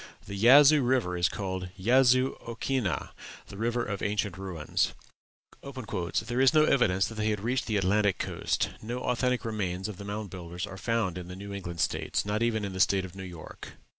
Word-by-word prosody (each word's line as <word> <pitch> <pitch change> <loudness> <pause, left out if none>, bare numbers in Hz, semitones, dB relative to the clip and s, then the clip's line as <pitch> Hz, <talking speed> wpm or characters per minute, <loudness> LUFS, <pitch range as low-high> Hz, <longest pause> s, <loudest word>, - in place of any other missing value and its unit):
The 100 - -8
Yazoo 140 +8 +7
River 120 -8 +1
is 90 0 +2
called 95 -2 -4
Yazoo 130 +5 +4
okhinnah 115 -3 -2 0.4
the - - -9
River 120 +2 0
of 100 -2 -4
Ancient 105 -2 -1
Ruins. 95 -5 -2 0.7
"There 120 -2 -3
is 135 +3 +5
no 155 - +7
evidence 95 -11 +3
that - - -7
they 110 0 -1
had 105 -2 -1
reached 125 +4 -1
the 110 -3 +1
Atlantic 100 +1 +2
coast; - - -1
no 120 +3 -4
authentic 125 0 0
remains 95 -4 -2
of 105 -4 -7
the 100 - -8
Mound 105 0 -5
Builders 90 0 -6
are 100 -1 -9
found 110 -7 -1
in 90 - -8
the 90 - -8
New 100 +1 -8
England 85 -4 -5
States, - - -1
nor 105 +2 -1
even 110 -3 +1
in 100 - -5
the 95 - -5
State 95 0 +3
of 95 0 -11
New 95 - -7
York." 90 -4 -9
105 Hz, 195 wpm, -28 LUFS, 95-120 Hz, 0.7 s, Yazoo